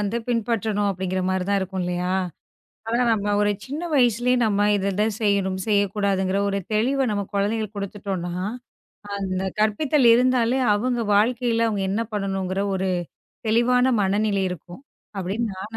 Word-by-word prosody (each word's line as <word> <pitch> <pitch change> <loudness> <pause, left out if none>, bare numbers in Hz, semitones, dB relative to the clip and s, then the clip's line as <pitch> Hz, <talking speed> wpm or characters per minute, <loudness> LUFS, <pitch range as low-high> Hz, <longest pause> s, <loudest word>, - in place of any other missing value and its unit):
வந்து 210 +3 -1
பின்பற்றணும் 220 -3 0
அப்படிங்கற 185 0 -2
மாதிரி 185 -1 0
தான் 200 0 +2
இருக்கும் 190 0 -3
இல்லையா? 180 +1 -1 0.8
அதான் 235 +1 +2
நம்ம 205 -1 -2
1 205 0 +3
சின்ன 290 +5 -5
வயசுலயே 245 -2 +3
நம்ம 205 -1 +2
இது 200 +1 0 0.2
செய்யணும் 195 -2 +1
செய்யக்கூடாதுங்கற 200 -2 +1
1 200 - -1
தெளிவ 260 +5 +2
நம்ம 205 -1 -1
குழந்தைகளுக்கு 210 +1 -1
கொடுத்துட்டோம்னா, 195 -3 -4 0.8
அந்த 190 -1 -2 0.2
கற்பித்தல் 240 +5 +3
இருந்தாலே 250 0 +2 0.2
அவங்க 240 +3 0
வாழ்க்கையில 230 +2 +2
அவங்க 205 -3 -1
என்ன 205 +4 0
பண்ணனும்ங்கற 195 -2 -2
1 190 0 -1 0.6
தெளிவான 240 +3 +3 0.2
மனநிலை 200 0 +1
இருக்கும் 180 - -8 0.4
அப்படின்னு 195 +5 -2
நான் 215 +4 -7
205 Hz, 135 wpm, -23 LUFS, 190-230 Hz, 0.8 s, 1